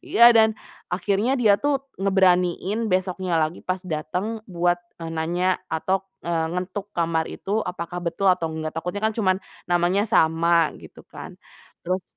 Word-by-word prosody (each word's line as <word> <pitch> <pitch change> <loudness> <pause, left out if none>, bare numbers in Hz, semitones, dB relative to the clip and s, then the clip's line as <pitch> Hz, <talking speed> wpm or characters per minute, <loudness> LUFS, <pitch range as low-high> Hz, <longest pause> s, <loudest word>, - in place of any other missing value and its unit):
iya 235 +1 +6
dan 220 -1 +4 0.3
akhirnya 200 +8 0
dia 215 -5 +4
tuh 290 -1 +2 0.2
ngeberaniin 190 +2 +2
besoknya 185 -1 0
lagi 160 +1 0
pas 185 +1 -3
dateng 180 +7 -3
buat, 175 0 +1 0.2
eee, 165 -1 -6
nanya 175 +3 0
atau 185 +4 0 0.2
eee, 165 -1 0
ngetuk 195 +3 -4
kamar 165 -1 0
itu 210 +3 -2
apakah 180 -1 -5
betul 175 +2 +2
atau 165 -2 -2
enggak, 155 0 -4
takutnya 180 +5 -4
kan 220 - +2
cuman 190 -4 +1 0.3
namanya 175 +4 +2
sama 165 0 +3
gitu - - -14
kan - - -10 0.5
terus, 185 +1 -1
180 Hz, 150 wpm, -23 LUFS, 170-200 Hz, 0.5 s, iya